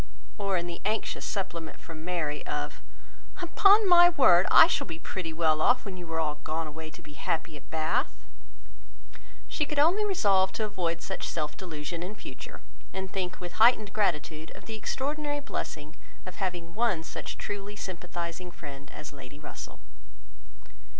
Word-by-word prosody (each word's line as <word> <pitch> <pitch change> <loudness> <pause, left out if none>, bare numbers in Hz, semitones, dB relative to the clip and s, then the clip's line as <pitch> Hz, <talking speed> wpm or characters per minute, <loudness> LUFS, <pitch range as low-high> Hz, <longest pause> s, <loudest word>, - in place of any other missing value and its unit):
or 195 -2 +1
in 170 - -1
the 175 -1 -6
anxious 215 +1 -1
supplement 170 -5 -4
from 160 -1 -9
Mary, 160 -4 -2
of—"Upon 145 - +1
my 350 -1 +9
word, 190 - +6
I - - +10
shall 335 - 0
be 165 - -5
pretty 165 0 -4
well 160 -1 +2
off, 245 +8 +4
when 195 -2 -5
you 175 -2 -8
are 160 - 0
all 150 -2 -1
gone 160 +1 -2
away 155 +1 -7
to - - -14
be 150 - -12
happy 160 +2 -2
at 135 -4 -13
Bath!" 155 -8 -1 1.2
She - - -1
could 300 0 -3
only 340 +9 +5
resolve 200 - +3
to 220 - -1
avoid 170 -5 -2
such - - -3
self 155 -3 -2
delusion 165 -2 -5
in 185 +4 -5
future, 130 -10 -9 0.3
and 190 -1 -5
think 185 -1 -3
with 180 +3 -6
heightened 220 -3 +6
gratitude 160 -5 0
of - - -12
the 225 - -5
extraordinary 290 +5 -2
blessing 155 - -5 0.3
of 185 - -8
having 175 -3 -3
one 215 -7 +1
such - - -6
truly 205 0 -5
sympathising 175 -2 -5
friend 140 -4 -10
as 150 - -8
Lady 135 0 -11
Russell. 150 - -9
175 Hz, 165 wpm, -29 LUFS, 155-210 Hz, 1.2 s, I